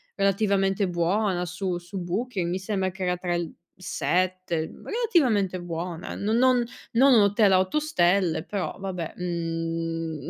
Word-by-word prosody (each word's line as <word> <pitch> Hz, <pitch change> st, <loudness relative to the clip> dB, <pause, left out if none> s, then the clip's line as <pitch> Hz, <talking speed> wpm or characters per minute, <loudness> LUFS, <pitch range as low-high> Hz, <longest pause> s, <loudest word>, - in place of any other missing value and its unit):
relativamente 195 Hz, -1 st, +2 dB
buona 180 Hz, +2 st, 0 dB
su 180 Hz, 0 st, -3 dB
su 175 Hz, +2 st, -7 dB
Booking, 185 Hz, 0 st, -2 dB
mi 180 Hz, -, -1 dB
sembra 190 Hz, -1 st, -1 dB
che 190 Hz, +1 st, -6 dB
era 180 Hz, 0 st, 0 dB
tra 175 Hz, -1 st, -2 dB
il 170 Hz, -2 st, -3 dB, 0.2 s
7 185 Hz, -2 st, -1 dB
mhmm, -, -, -15 dB
relativamente 265 Hz, -, +2 dB
buona, 170 Hz, 0 st, -5 dB
non 215 Hz, +3 st, 0 dB
non 250 Hz, -1 st, +4 dB, 0.3 s
non 265 Hz, +3 st, +6 dB
un 225 Hz, -, +7 dB
hotel 205 Hz, 0 st, +4 dB
a 185 Hz, -, +6 dB
8 185 Hz, +11 st, +1 dB
stelle, 180 Hz, -, +2 dB
però 200 Hz, -3 st, -3 dB
vabbè, 180 Hz, -4 st, -4 dB
mhmm, 165 Hz, -3 st, -3 dB
185 Hz, 150 wpm, -26 LUFS, 175-205 Hz, 0.3 s, un